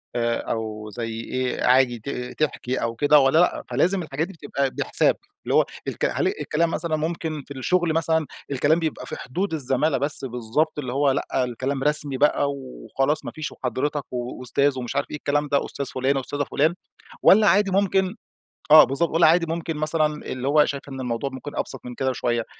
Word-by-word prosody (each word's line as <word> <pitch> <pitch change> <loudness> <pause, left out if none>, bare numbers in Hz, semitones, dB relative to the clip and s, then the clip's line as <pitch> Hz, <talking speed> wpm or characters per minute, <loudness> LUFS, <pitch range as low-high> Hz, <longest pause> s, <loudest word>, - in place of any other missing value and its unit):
آآ، 115 -1 +1
أو 110 -1 -4
زَي 115 +2 -5
إيه، 130 -1 -2
عادي 125 -2 +4
ت 125 +1 -6
تحكي 130 -3 -2
أو 115 0 -2
كده 145 +4 +5
والّا 135 +3 +3
لأ. 175 - +2
فلازم 185 +1 +1
الحاجات 155 +1 -3
دي 195 - -11
بتبقى 145 -4 -2
بحساب، - - +1 0.3
اللي - - -1
هو - - +5 0.2
الك - - -2
هل - - 0
الكلام 165 +2 0
مثلًا 160 -1 -1
ممكن 155 -1 -3
في 140 - -8
الشغل 170 +4 +1
مثلًا، 160 -1 +1 0.3
الكلام 145 +5 +2
بيبقى 160 -2 -3
في - - -6
حدود 180 +9 -3
الزمالة 140 0 +1
بس، 140 +1 +1
بالضبط، 125 +6 -1
اللي 130 -3 -4
هو 140 0 +3
لأ، 130 -1 -1
الكلام 130 +3 -3
رسمي 145 -2 +2
بقى 145 0 +2
وخلاص 135 +2 -3
ما - - -4
فيش 155 -1 -5
وحضرِتك 140 +3 -2
وأستاذ 125 +2 -1
ومش 120 - -5
عارف 140 - -1
إيه، 150 - -4
الكلام 145 +1 0
ده 140 -1 +1
أستاذ 140 - -4
فُلانة 135 +1 0
أستاذة 145 +2 -2
فُلان، 155 +5 +1 0.5
والّا 210 +2 +7
عادي 195 +2 +4
ممكن 190 0 +1 0.6
آه، 155 0 +11
بالضبط، 140 +6 0
والّا 165 +1 +4
عادي 170 +2 +4
ممكن 165 -1 -3
مثلًا 155 +1 +1 0.2
اللي 130 +1 -4
هو 150 +1 +5
شايف 140 0 -5
إن 135 -1 -7
الموضوع 125 +2 -2
ممكن 130 +2 -8
أبسط - - -3
من 125 0 -7
كده 130 +1 0
بشوية. 120 -2 -1
140 Hz, 190 wpm, -23 LUFS, 130-155 Hz, 0.6 s, آه